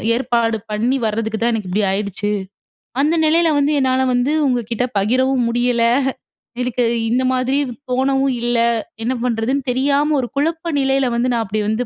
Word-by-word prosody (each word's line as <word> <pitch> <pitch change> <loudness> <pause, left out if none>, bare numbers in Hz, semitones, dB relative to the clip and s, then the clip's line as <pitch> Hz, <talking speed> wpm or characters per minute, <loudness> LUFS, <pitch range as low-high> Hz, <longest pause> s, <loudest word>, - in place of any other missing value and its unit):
ஏற்பாடு 235 -2 0
பண்ணி 230 +5 0
வர்றதுக்கு 220 0 -2
தான் 235 +1 +1
எனக்கு 215 -4 -3
இப்பிடி 205 +4 0
ஆயிடுச்சு. 205 +1 -2 0.7
அந்த 305 +4 +2
நிலையில 330 +1 +3
வந்து 285 +1 +2
என்னால 260 -1 +2
வந்து 245 +3 +1 0.2
உங்கக்கிட்ட 245 -1 -1
பகிரவும் 255 +5 +1
முடியல 240 0 +1 0.8
எனக்கு 250 0 0 0.3
இந்த 250 +3 +1
மாதிரி 255 +2 0 0.3
தோணவும் 270 +1 +1
இல்ல. 240 0 +1 0.5
என்ன 245 +3 0
பண்றதுன்னு 250 +3 0
தெரியாம 285 +4 +1
1 250 - -2
குழப்ப 325 +3 -1
நிலையில 270 -1 +1
வந்து 240 +2 +1
நான் 230 -1 0
அப்பிடி 215 +1 -2
வந்து 225 +3 -1
250 Hz, 150 wpm, -19 LUFS, 230-270 Hz, 0.8 s, நிலையில